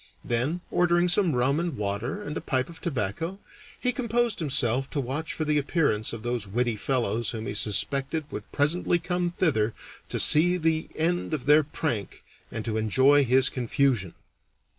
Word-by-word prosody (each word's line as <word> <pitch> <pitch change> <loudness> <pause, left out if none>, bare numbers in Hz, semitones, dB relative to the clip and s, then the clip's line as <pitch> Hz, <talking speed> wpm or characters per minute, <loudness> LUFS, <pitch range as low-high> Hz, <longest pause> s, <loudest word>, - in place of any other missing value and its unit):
Then, 130 +9 -1
ordering 175 0 +2
some 175 -4 +2
rum 130 +5 +1
and 170 -5 -3
water 105 - -3
and 150 - -6
a - - -3
pipe 130 0 -1
of 170 - -10
tobacco, 160 - -3 0.4
he 250 - +1
composed 240 -3 -1
himself 135 -4 +1
to 150 - -3
watch 140 +5 -3
for 155 - -3
the 150 -1 +2
appearance 140 -8 0
of 115 -2 -7
those 120 -3 -2
witty 120 +3 -1
fellows 115 0 -1
whom 110 -1 -5
he - - -4
suspected 135 +9 0
would 105 - -8
presently 165 +4 +1
come 180 0 -2
thither 115 -11 0 0.3
to - - -2
see 175 +4 +6
the 160 -1 0
end 165 0 -1
of 135 - -7
their 150 +2 +6
prank 140 - -4 0.3
and 115 - -5
to 110 -2 -2
enjoy 130 +6 +4
his 130 +1 +4
confusion. 120 -6 0
140 Hz, 170 wpm, -26 LUFS, 115-165 Hz, 0.4 s, see